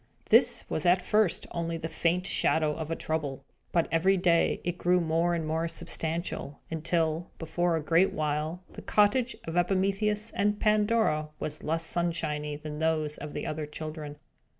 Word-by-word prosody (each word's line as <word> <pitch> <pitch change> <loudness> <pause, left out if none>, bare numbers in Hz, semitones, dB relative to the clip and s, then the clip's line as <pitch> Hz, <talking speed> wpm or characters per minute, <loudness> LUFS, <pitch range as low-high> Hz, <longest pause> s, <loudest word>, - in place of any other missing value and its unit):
This - - +5
was 155 - -2
at 180 +1 +4
first 210 -4 +2
only 170 -1 -2
the 160 0 -4
faint 175 +2 0
shadow 155 -5 +2
of 160 -1 -5
a 165 - -1
Trouble; 145 -5 -3 0.3
but, 170 -2 +2
every 185 +4 +3
day, 175 -2 +3
it 175 +1 -3
grew 180 +1 +3
more 170 +1 +1
and 165 -2 -2
more 160 +2 -1
substantial, 165 -3 -3
until, 160 +1 0
before 175 +1 0
a 160 - -2
great 165 +5 +3
while, 155 +3 -2
the - - -8
cottage 230 +5 +2
of 165 - -5
Epimetheus 195 +4 +1
and 205 +1 0
Pandora 210 -8 +2
was 155 - -3
less 165 +1 -1
sunshiny 160 -4 -1
than 150 0 -7
those 155 -2 0
of 150 - -7
the - - -4
other 155 -1 -3
children. 155 -1 -6
165 Hz, 165 wpm, -29 LUFS, 155-180 Hz, 0.3 s, This